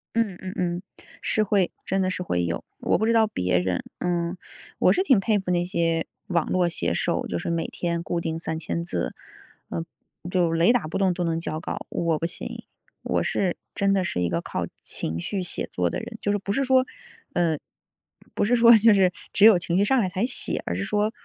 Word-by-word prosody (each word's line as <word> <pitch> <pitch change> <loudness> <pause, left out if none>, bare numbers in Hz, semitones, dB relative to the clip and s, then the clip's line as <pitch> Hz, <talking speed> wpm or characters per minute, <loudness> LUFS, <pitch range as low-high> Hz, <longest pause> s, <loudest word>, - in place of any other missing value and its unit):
嗯 210 -6 0
嗯 185 0 -5
嗯， 175 0 -1 0.4
是 215 - +1
会 195 -3 +2 0.2
真 195 - +1
的 185 - +1
是 185 - -3
会 90 - 0
有。 85 - -3 0.2
我 - - +2
不 220 - +1
知 230 - +3
道 225 -1 +5
别 90 - 0
人， 90 0 0 0.2
嗯， 175 0 -1 0.4
我 - - +5
是 370 - +1
挺 260 - +5
佩 205 +1 +2
服 190 - -6
那 175 0 +1
些 165 -2 0 0.2
网 170 -3 0
络 180 -2 +2
写 - - -1
手， - - 0
就 85 - -2
是 - - -4
每 165 -1 0
天 170 -1 -2
固 170 0 -2
定 160 -1 -2
3000 165 +1 -3
字， - - -3 0.6
呃 165 - -3 0.5
就 175 -3 +2
雷 165 +6 +4
打 245 -1 +3
不 - - -3
动 190 -2 +3
都 175 0 -2
能 165 -1 0
交 155 -1 -3
稿。 - - -5
我 165 -2 0
不 - - -1
行， 175 - -5 0.4
我 - - 0
是 185 -3 0 0.2
真 200 0 +1
的 195 -1 +2
是 90 - -2
一 90 - +1
个 85 -1 0
靠 - - -3 0.2
情 80 +1 -2
绪 190 - -2
写 180 - -3
作 90 -1 0
的 - - -3
人。 225 - -8
就 205 - +1
是 205 - +2
不 200 0 -4
是 275 - +1
说， 260 -1 +4 0.5
呃， 165 -3 +2 0.8
不 - - +2
是 245 - +3
说 235 -1 +8
就 220 +1 +6
是 190 -2 +4 0.2
只 205 - +6
有 220 -4 +9
情 175 0 -1
绪 - - +4
上 265 +5 +3
来 205 - +2
才 185 +5 -1
写， 255 - -2
而 85 - -1
是 95 - -2
说 210 - +1
180 Hz, 235 characters per minute, -25 LUFS, 165-205 Hz, 0.8 s, 有